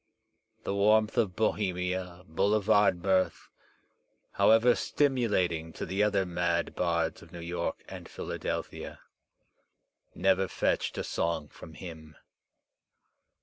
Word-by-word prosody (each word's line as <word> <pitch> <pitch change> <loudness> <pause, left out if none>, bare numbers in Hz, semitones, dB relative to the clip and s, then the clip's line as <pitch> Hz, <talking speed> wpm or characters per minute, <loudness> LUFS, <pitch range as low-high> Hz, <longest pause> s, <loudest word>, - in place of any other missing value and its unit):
The - - -2
warmth 105 +2 +3
of 105 -7 +1
Bohemia, 90 -4 -1
boulevard 100 +1 +2
mirth, 95 -1 +1 0.8
however 115 +2 +5
stimulating 105 - 0
to - - -5
the 95 +2 -1
other 100 -2 +2
mad 85 -1 -1
bards 85 -2 -1
of 85 - -15
New 85 - -8
York 85 0 -3
and - - -9
Philadelphia, - - -5 1.1
never 95 +1 +2
fetched - - -1
a - - -1
song 80 -3 -2
from 80 - -12
him. 80 -3 -10
90 Hz, 105 wpm, -29 LUFS, 85-105 Hz, 1.1 s, however